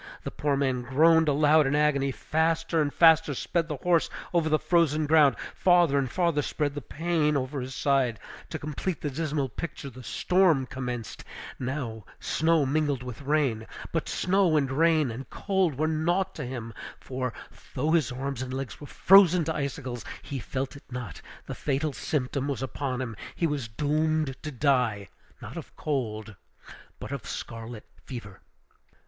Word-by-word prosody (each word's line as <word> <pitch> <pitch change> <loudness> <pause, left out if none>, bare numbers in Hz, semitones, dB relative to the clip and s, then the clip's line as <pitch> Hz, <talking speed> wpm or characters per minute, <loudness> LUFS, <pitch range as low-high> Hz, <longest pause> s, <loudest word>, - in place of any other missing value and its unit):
The - - -4
poor 145 -2 0
man 130 -3 0
groaned 160 +5 +4
aloud 150 +1 +4
in 135 - +1
agony; 145 -2 +2
faster 160 +3 0
and 145 -1 0
faster 160 -3 +5
sped 165 +5 -1
the 150 -3 -4
horse 170 +3 +2 0.2
over 165 -2 +2
the 155 - +4
frozen 155 -3 +2
ground, 150 -2 +5 0.2
farther 175 -6 +4
and 135 -2 -1
farther 170 -1 +1
spread 145 0 -2
the 145 - -5
pain 155 +2 0
over 135 +1 -3
his 130 +1 -6
side. 135 -6 +1 0.3
To - - -4
complete 155 +4 -4
the 145 - -2
dismal 150 -1 -1
picture 140 +2 -6
the 130 +1 -11
storm 165 - +2
commenced, 125 -4 -5 1.0
snow 160 -1 +2
mingled 145 -2 0
with 125 0 -7
rain. 140 -6 0 0.2
But 165 - -2
snow, 185 -4 +2
and 135 -3 +1
rain, 155 -2 +3
and 130 +4 -7
cold 190 -8 0
were 155 +2 +1
naught 175 +5 0
to - - -5
him; 120 -3 -6 0.3
for, 130 -1 -3 0.4
though 150 +5 +1
his 160 -8 +2
arms 130 +1 -4
and 130 -1 -4
legs 135 +1 -5
were 145 - -8
frozen 180 -1 +6
to 160 0 -2
icicles, 135 -4 -4 0.2
he 140 - -5
felt 130 +4 -4
it 140 - -12
not; 125 -5 -6 0.2
the - - -5
fatal 145 +1 -1
symptom 135 +2 -2
was 135 -3 -2
upon 130 +1 -3
him; 115 -4 -4 0.2
he 170 - 0
was 145 -6 -1
doomed 150 +3 0
to 155 - -5
die, 125 -7 +1 0.3
not - - -8
of - - -9
cold, 110 -7 -3 0.6
but - - -7
of 140 -5 -5
scarlet 115 -1 -7 0.2
fever! 105 -7 -9
145 Hz, 165 wpm, -27 LUFS, 130-160 Hz, 1.0 s, frozen